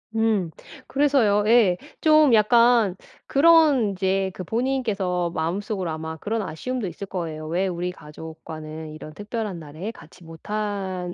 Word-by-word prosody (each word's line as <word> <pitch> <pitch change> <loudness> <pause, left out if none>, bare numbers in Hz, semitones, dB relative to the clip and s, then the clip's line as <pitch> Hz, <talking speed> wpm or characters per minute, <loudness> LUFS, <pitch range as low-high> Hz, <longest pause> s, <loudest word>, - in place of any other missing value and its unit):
음 215 -6 +1 0.4
그래서요 265 -8 +3
예. 220 -6 +5 0.2
좀 310 -5 +5
약간 230 -2 +4 0.3
그런 295 -6 +5
인제 190 0 0
그 185 - -6
본인께서 210 -8 -1
마음속으로 185 +3 -2
아마 160 0 -5
그런 220 +6 -2
아쉬움도 225 +5 -4
있을 185 +4 -7
거예요. 160 -5 -5
'왜 180 +4 0
우리 180 0 -3
가족과는 155 -1 -9
이런 155 0 -10
특별한 205 -1 -5
날에 155 +7 -7
같이 185 - -16
못한 190 +1 -4
195 Hz, 290 characters per minute, -24 LUFS, 170-225 Hz, 0.4 s, 예